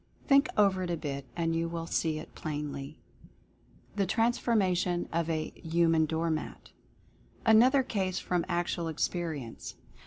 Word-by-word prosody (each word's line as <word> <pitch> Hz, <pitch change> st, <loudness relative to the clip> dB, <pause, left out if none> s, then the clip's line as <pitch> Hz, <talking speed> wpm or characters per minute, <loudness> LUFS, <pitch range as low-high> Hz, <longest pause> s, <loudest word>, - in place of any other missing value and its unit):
Think 280 Hz, 0 st, +5 dB
over 195 Hz, -3 st, +4 dB
it 180 Hz, -, -3 dB
a 170 Hz, -, -1 dB
bit 140 Hz, -3 st, -5 dB
and 165 Hz, -1 st, 0 dB
you 165 Hz, 0 st, 0 dB
will 165 Hz, -1 st, -4 dB
see 160 Hz, -1 st, 0 dB
it 155 Hz, -, -9 dB
plainly. 150 Hz, -1 st, -5 dB, 1.0 s
THE 200 Hz, -2 st, +1 dB
TRANSFORMATION 195 Hz, -5 st, +1 dB
OF 170 Hz, 0 st, 0 dB
A 155 Hz, -1 st, -2 dB
"HUMAN 165 Hz, -1 st, +3 dB
DOOR 160 Hz, +1 st, 0 dB
MAT." 155 Hz, -, -5 dB, 0.7 s
Another 250 Hz, +5 st, +6 dB
case, 190 Hz, -6 st, -2 dB
from 180 Hz, -3 st, 0 dB
actual 175 Hz, -1 st, -1 dB
experience. 160 Hz, -6 st, -3 dB
170 Hz, 135 wpm, -30 LUFS, 160-190 Hz, 1.0 s, Another